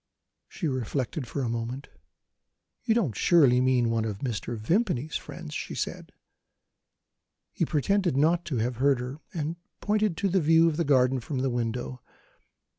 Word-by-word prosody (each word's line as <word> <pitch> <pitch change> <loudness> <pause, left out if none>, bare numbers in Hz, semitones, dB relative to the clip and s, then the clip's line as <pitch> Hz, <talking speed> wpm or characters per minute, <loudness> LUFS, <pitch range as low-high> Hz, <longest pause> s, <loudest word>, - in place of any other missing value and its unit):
She 170 - -4
reflected 130 +1 -2
for 135 +3 -3
a - - -1
moment. 120 +4 -4 1.0
"You 225 - +3
don't 170 - +1
surely 135 - +5
mean 125 -2 +2
one 115 -1 +1
of 105 -3 -3
Mr. 115 -1 -3
Vimpany's 160 - 0
friends?" 165 -3 -6
she - - -4
said. - - -4 1.4
He - - 0
pretended 175 +1 +1
not 165 +4 +3
to 140 -7 -2
have 120 +2 -1
heard 135 0 +3
her, 125 +4 -6
and 160 0 -3 0.2
pointed 210 -4 +1
to 200 - +1
the 190 0 +2
view 165 +2 +5
of 155 -2 0
the 170 - +1
garden 130 -2 +3
from 135 +3 -5
the 135 - +1
window. 120 +1 -3
135 Hz, 160 wpm, -27 LUFS, 120-165 Hz, 1.4 s, surely